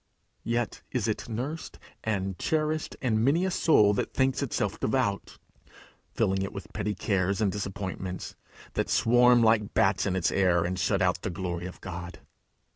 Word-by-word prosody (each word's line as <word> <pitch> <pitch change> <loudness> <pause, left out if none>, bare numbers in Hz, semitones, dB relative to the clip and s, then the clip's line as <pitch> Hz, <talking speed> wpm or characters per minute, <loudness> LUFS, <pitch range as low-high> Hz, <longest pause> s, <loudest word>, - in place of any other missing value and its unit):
Yet 115 -3 -2
is - - -1
it - - -3
nursed 135 +8 -5 0.3
and 95 -4 -2
cherished 155 0 -1
in 110 -3 +2
many 155 +8 +3
a 190 - 0
soul 105 -13 +4
that - - -3
thinks 130 0 +2
itself 110 -7 -2
devout, 110 -4 -1 0.8
filling 95 0 +1
it 95 - -3
with - - -9
petty 105 +1 -2
cares 95 -1 0
and 105 -3 +2
disappointments, 95 -2 -5 0.4
that - - -1
swarm 120 +1 +5
like 110 -2 +2
bats - - +3
in 95 - 0
its 95 - +1
air, 90 -3 +3
and 90 +1 -2
shut 100 0 +1
out 90 0 +1
the - - -3
glory 90 -1 -4
of 90 - -11
God. 90 -1 -7
100 Hz, 165 wpm, -28 LUFS, 95-120 Hz, 0.8 s, swarm